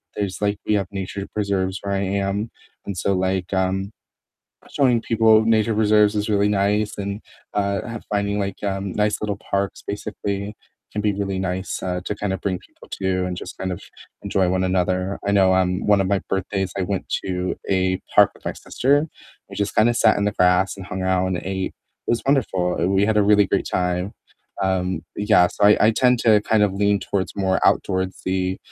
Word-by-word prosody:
there's, 100 -2 -3
like 100 0 +1
we 105 - +2
have 100 -2 +1
nature 100 0 -5
preserves 95 -2 -1
where 100 0 -2
I - - 0 0.2
am, 100 +3 -2 0.4
and 100 - -4
so, 100 - +1
like, 95 0 -1
um, 95 +1 0 0.8
showing 125 -5 +2
people 110 -1 +4
nature 110 0 +2
preserves 105 -1 +4
is 105 +1 -1
really 105 0 +3
nice 105 +1 +1
and, 100 +1 -4 0.3
uh, 100 -1 0 0.3
finding, 100 0 0
like, 100 -1 -4
um, 95 -1 -2
nice 105 0 0
little 105 -2 -2
parks 100 -1 -3
basically 100 0 -4 0.3
can 105 - -3
be 105 -1 +2
really 100 -1 -3
nice, 95 0 -3
uh, 90 -1 -2
to - - -1
kinda 95 -2 -2
bring 95 -2 -2
people - - -19
to 95 -1 0
and 90 - -4
just - - -8
kind 95 -1 -3
of 90 - -6 0.4
enjoy 95 -2 +1
one 95 0 +1
another. 90 +1 0
I 100 - +1
know, 95 -2 +4
um, 90 0 +1
one 105 -1 +4
of 95 - +1
my 100 -1 +1
birthdays, 95 -1 -2
I 95 - 0
went 95 +1 -3 0.2
to 90 -1 -2
a 95 -1 +1
park - - +7
with - - -21
my - - -2
sister, 145 +4 +1 0.4
we - - -8
just 100 0 -2
kinda 115 +3 +5
sat 110 -2 +4
in 100 - 0
the 105 - +1
grass 90 +2 +2
and 95 - -8
hung 95 -1 -4
out 95 0 +1
and 95 -1 -1
ate. 95 0 -3 0.3
It - - -1
was 120 - +1
wonderful; 95 - +1
we 95 +1 +3
had 110 - +1
a - - +5
really 105 -1 +5
great 100 - -1
time. 90 +2 -1 0.5
Um, 95 -3 0
yeah, 105 -4 +4
so - - 0
I 105 - +7
I 110 - +6
tend 125 +1 +3
to 110 -2 +5
kind 110 0 +2
of 100 -2 +2
lean 100 0 +2
towards 95 -2 -2
more 95 -1 +1
outdoorsy, 95 0 0
100 Hz, 200 wpm, -22 LUFS, 95-105 Hz, 0.8 s, park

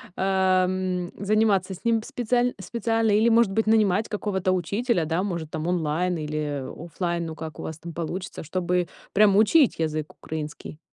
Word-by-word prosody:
ам, 185 -1 +1
заниматься 200 -2 +2
с 185 - -12
ним 230 -1 +2
специаль 245 -2 0
специально 225 +1 0
или, 220 +3 +4
может 230 -3 +4
быть, 220 +2 0
нанимать 215 -1 +3
какого-то 195 -3 -1
учителя, 185 +1 0
да, 165 +4 0
может, 170 -5 -4
там, 160 +1 -3
онлайн 175 +1 0
или, 155 0 -3
э, 145 -3 -3 0.2
офлайн, 170 0 -2
ну, 160 -1 -6
как 160 0 -8
у - - -5
вас 160 0 -6
там 170 -1 -8
получится, 170 +3 -5
чтобы 180 +1 -1 0.3
прям 200 -1 +5
учить 240 - +4
язык 155 -1 -2
украинский? 155 0 -6
185 Hz, 165 wpm, -25 LUFS, 165-215 Hz, 0.3 s, прям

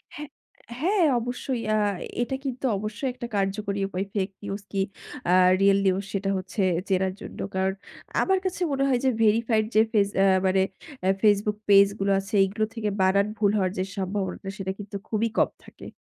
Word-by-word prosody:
হ্যাঁ, 295 -1 -7 0.5
হ্যাঁ 365 +2 +3
অবশ্যই। 245 +1 -3
আ - - +3 0.4
এটা 265 +2 -1
কিন্তু 260 0 -3
অবশ্যই 215 +6 -3
একটা 240 -1 -6
কার্যকরী 200 +1 -1
উপায় 190 +1 -3
ফেক 195 -1 -1
নিউজ 200 0 -4
কি 195 -1 0 0.5
আ - - +5 0.3
রিয়াল 200 0 +5
নিউজ 190 +1 +2
সেটা 195 0 -1
হচ্ছে 185 +2 -4 0.3
চেনার 190 0 +1
জন্য। - - -9 0.2
কারণ 190 0 +1 0.5
আমার 380 0 +2
কাছে 370 0 -3
মনে 275 0 +1
হয় 250 -2 +2
যে - - +5
ভেরিফাইড 220 0 +3
যে 215 - +7
ফেজ 205 -3 +3
অ্যা 195 - +5 0.2
মানে 190 0 +3 0.4
অ্যা 190 +1 +3
Facebook 210 0 +3
পেইজ 200 0 +8
গুলো 195 0 +1
আছে 195 +2 -9
এগুলো 215 +3 0
থেকে 215 -2 -1
বানান 200 +2 +3
ভুল 205 -2 +3
হওয়ার 185 -2 +1
যে - - +1
সম্ভাবনাটা 195 0 -3
সেটা 190 -1 -3
কিন্তু 205 0 -8
খুবই 225 +1 0
কম - - +4 0.2
থাকে। - - -12
205 Hz, 180 wpm, -25 LUFS, 195-230 Hz, 0.5 s, পেইজ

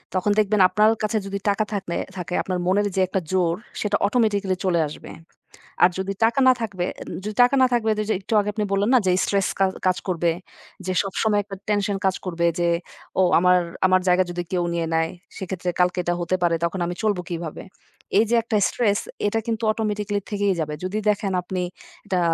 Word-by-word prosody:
তখন 185 +3 +1
দেখবেন, 210 0 +2
আপনার 210 +4 +4
কাছে 215 +1 +1
যদি 200 0 -3
টাকা 205 +2 +1
থাকলে 190 -4 -3 0.2
থাকে, 180 0 -5
আপনার 185 -1 -2
মনের 205 +2 +2
যে 190 - +2
একটা 190 - -1
জোর, 175 -3 +2 0.3
সেটা 205 -1 +1
অটোমেটিক্যালি 205 -4 +1
চলে 175 -2 +2
আসবে। 150 - -10 0.7
আর 180 - +8
যদি 195 +1 -2
টাকা 235 +4 +3
না 255 - +8
থাকবে 195 -5 -2
এ - - -10 0.2
উম - - -5
যদি 210 0 -4
টাকা 250 +3 +3
না 255 - +6
থাকবে, 225 -2 +1 0.3
একটু - - -4
আগে 205 0 -1
আপনি 210 - -1
বললেন 200 +2 +1
না - - +7
যে, - - +4
"স্ট্রেস 200 -1 +1
কা 195 - +5 0.2
কাজ 185 - +2
করবে। 170 -2 +1 0.5
যে 185 - -1
সবসময় 205 +2 0
একটা 200 -1 -8
টেনশন 205 -1 +1
কাজ 190 -1 +2
করবে, 170 -2 -1
যে 170 - +2 0.5
ও - - +6 0.2
আমার 180 +1 +5 0.3
আমার 185 0 +3
জায়গা 180 +1 +4
যদি 175 0 -3
কেউ 180 -1 +1
নিয়ে 165 -1 -1
নেয়, 160 0 +1 0.3
সেক্ষেত্রে 185 -1 -4
কালকে 180 +1 +2
এটা 175 - 0
হতে 175 +2 0
পারে। 170 -1 +3
তখন 175 +3 -3
আমি 175 +1 -3
চলবো 205 -4 +1
কীভাবে?" 170 -3 -5 0.6
এইযে 225 +2 +3
একটা 225 -1 0
স্ট্রেস, 210 -4 +1 0.3
এটা 225 +2 0
কিন্তু 230 0 -2
অটোমেটিক্যালি 210 -2 -2
থেকেই 205 -1 +1
যাবে। 150 -1 -2
যদি 185 +3 -2
দেখেন, 205 -1 0
আপনি 180 +1 -4 0.4
এটা 190 -3 0
195 Hz, 200 wpm, -23 LUFS, 180-210 Hz, 0.7 s, আর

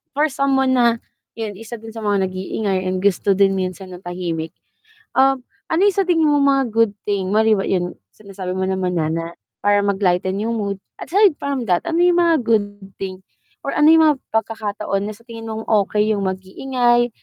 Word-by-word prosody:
for 300 0 +2
someone 265 -1 +2
na, 235 -2 +2 0.3
'yun 220 -2 -4
isa 225 +1 -7
din 225 0 -10
sa 225 - -8
mga 200 -3 0
nag-iingay 190 +1 -2
and 185 +1 -2
gusto 200 0 +2
din 195 -1 +3
minsan 185 0 -5
ng 180 - -9
tahimik. 175 -3 -4 0.6
Um, 270 -1 +4 0.3
ano 340 - +2
'yung 405 -1 +3
sa 390 - +3
tingin 325 -4 +3
mo 290 - +3
mga 275 -3 +3
good 225 -1 +2
thing 200 -1 -2
mali 220 -1 +4
ba 195 - -1
'yun 180 -1 -1 0.2
sinasabi 195 -3 -7
mo 190 - -3
naman 185 -1 -1
na 160 -2 0
na 165 +1 -2 0.3
para 205 0 +2
mag-lighten 190 -1 +1
'yung 225 +3 -1
mood, 200 -3 -2 0.2
aside 395 0 +4
from 275 -4 -2
that 180 -3 +2
ano 330 - 0
'yung 350 0 +4
mga 325 -8 +2
good 205 -3 +1 0.2
thing 190 -1 -6 0.4
or 275 - -2
ano 300 +1 +5
'yung 320 0 +7
mga 300 -2 +4
pagkakataon 215 -2 -2
na 215 - -8
sa 230 - -23
tingin 225 -1 -8
mong 220 0 -5
okey 210 0 +2
'yung 200 - -2
mag-iingay 240 +6 0
215 Hz, 195 wpm, -20 LUFS, 190-260 Hz, 0.6 s, yung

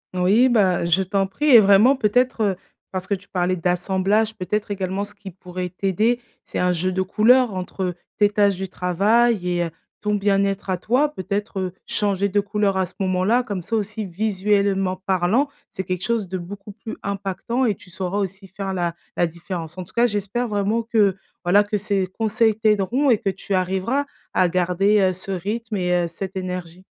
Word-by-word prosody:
Oui, 200 +8 +4
bah, 190 -7 +3
je 170 +3 +3
t'en 195 +1 0
prie 295 +11 -1
et 240 - +10
vraiment 210 +6 +6
peut-être, 245 0 +1
heu, 200 -3 +2 0.4
parce 185 -1 -3
que 200 - -1
tu 195 0 -5
parlais 180 0 0
d'assemblage, 190 +5 +1
peut-être 205 +2 -2
également, 190 0 -2
ce 205 - -8
qui 200 -1 -10
pourrait 180 0 -6
t'aider, 200 +6 0 0.2
c'est - - -7
un 180 0 +2
jeu 180 +2 0
de 190 +1 0
couleur 230 +4 +4
entre, 185 +1 -4
heu, 180 -1 -1 0.2
tes 205 - +5
tâches 205 -1 +2
du 190 +1 -4
travail 200 +4 +2
et 175 -1 +1
heu, - - -4 0.3
ton 210 0 0
bien-être 195 -1 +1
à 185 - +1
toi, 255 +10 +2
peut-être, 205 -4 -3
heu, 185 -1 -3
changer 200 -1 0
de 205 +1 +1
couleur 205 -1 0
à 190 -1 +1
ce 180 - -19
moment-là, 190 +6 +2
comme 200 -6 -4
ça 225 +7 -3
aussi, 215 +1 -2
visuellement 195 0 0
parlant, 190 +8 +2 0.2
c'est 190 - -5
quelque 185 0 -3
chose 230 -4 0
de 185 +1 -4
beaucoup 195 +3 -9
plus 220 +2 -8
impactant 200 +5 -2
et 215 -4 +1
tu 180 - -17
sauras 185 +2 -3
aussi 195 0 -4
faire 195 +1 -5
la 175 -2 -1 0.2
la 175 - +2
différence. 170 0 -7
En 185 - -4
tout - - -12
cas, 240 +1 +4
j'espère 210 +3 -1
vraiment 210 +1 0
que, 210 -4 +2 0.3
voilà, 200 +4 +5
que 210 +1 -2
ces 200 -2 -1
conseils 220 +3 +1
t'aideront 220 +5 +2
et 220 - +3
que 195 - -1
tu 195 +1 -4
arriveras 190 +9 0 0.3
à 180 -1 +3
garder, 185 +4 +2
heu, 185 -1 +3
ce 185 +2 -8
rythme 215 +5 -3
et 180 -1 0
heu, - - -3
cette 190 +3 -7
énergie. 180 -1 -5
195 Hz, 200 wpm, -22 LUFS, 185-210 Hz, 0.4 s, et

